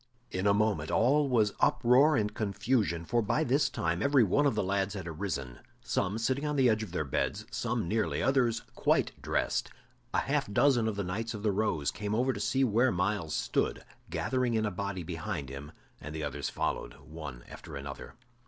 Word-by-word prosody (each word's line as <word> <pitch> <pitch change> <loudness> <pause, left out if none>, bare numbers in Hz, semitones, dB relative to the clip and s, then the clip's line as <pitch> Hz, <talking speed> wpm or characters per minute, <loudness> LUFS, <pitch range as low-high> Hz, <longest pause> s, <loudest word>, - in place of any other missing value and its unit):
In 95 +2 0
a - - +6
moment 105 -8 +1
all 140 +4 +3
was 110 -5 +3
uproar 135 +6 +4
and 105 -1 0
confusion, 105 -4 0
for 120 +7 +1
by 130 +8 +1
this 140 +1 +2
time 85 +1 -1
every 140 -3 +4
one 145 +9 +3
of 135 - +1
the 105 - +1
lads 100 +1 0
had 95 -4 -5
arisen, 75 -7 -4 0.2
some 100 +2 -1
sitting 130 +5 0
on 150 0 -1
the 135 -2 +4
edge 110 -1 +2
of 110 - -6
their 90 -3 -1
beds, 65 - -1
some - - -1
nearly, 110 +4 0
others 125 -4 +2
quite - - +2
dressed. - - -1 0.5
A - - +4
half - - -1
dozen 120 0 +3
of 110 - -1
the 100 - -2
Knights 110 +6 -3
of 105 - -7
the 105 - +2
Rose 95 -8 0
came 105 +1 -3
over 130 +3 +2
to 130 +5 0
where 120 +1 +3
Myles 90 -4 -1
stood, - - -1 0.2
gathering 125 -2 0
in 110 -1 +1
a 105 - -1
body 95 0 -4
behind 80 -5 -4
him 70 +2 -8 0.3
and 75 +1 -8
the 80 - -3
others 70 0 -3
followed, - - -3
one 75 -6 -8
after - - -10
another. 70 -1 -7
105 Hz, 195 wpm, -30 LUFS, 85-120 Hz, 0.5 s, a